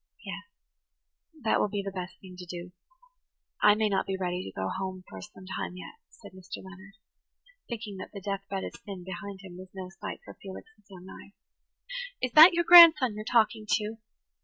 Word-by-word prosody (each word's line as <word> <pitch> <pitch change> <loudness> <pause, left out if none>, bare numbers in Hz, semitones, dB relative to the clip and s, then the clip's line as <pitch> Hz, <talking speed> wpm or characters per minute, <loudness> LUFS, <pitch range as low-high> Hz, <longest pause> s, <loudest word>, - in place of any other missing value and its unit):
"Yes, 200 +1 -7 0.9
that 220 - +2
will - - +2
be 205 -1 -3
the 195 - -4
best 185 -1 -7
thing 185 -1 -13
to 180 - -9
do. 175 +1 -7 0.9
I 210 0 +6
may 215 0 +1
not 195 -2 0
be 190 0 -2
ready 180 -1 -2
to - - -8
go 95 - -1
home 185 - -5
for 95 - -10
some 185 - -13
time 185 -1 -5
yet," 450 - -11
said - - -15
Mr. 185 0 -9
Leonard, 195 +1 -13 0.7
thinking 220 -4 -6
that 185 - -8
the 200 - -8
death 195 0 -3
bed 195 -1 -3
of - - -6
sin 195 -3 -8
behind 190 +2 -8
him 180 -2 -11
was 185 0 -11
no 185 -1 -7
sight 210 - -5
for - - -10
Felix's 205 - -12
young 185 -2 -12
eyes. 200 - -12 0.9
"Is 255 - -2
that 320 +7 +10
your 345 0 +2
grandson 325 -8 +9
you're 215 +1 -6
talking 220 -2 +1
to?" 215 +1 -1
195 Hz, 195 wpm, -28 LUFS, 185-215 Hz, 0.9 s, that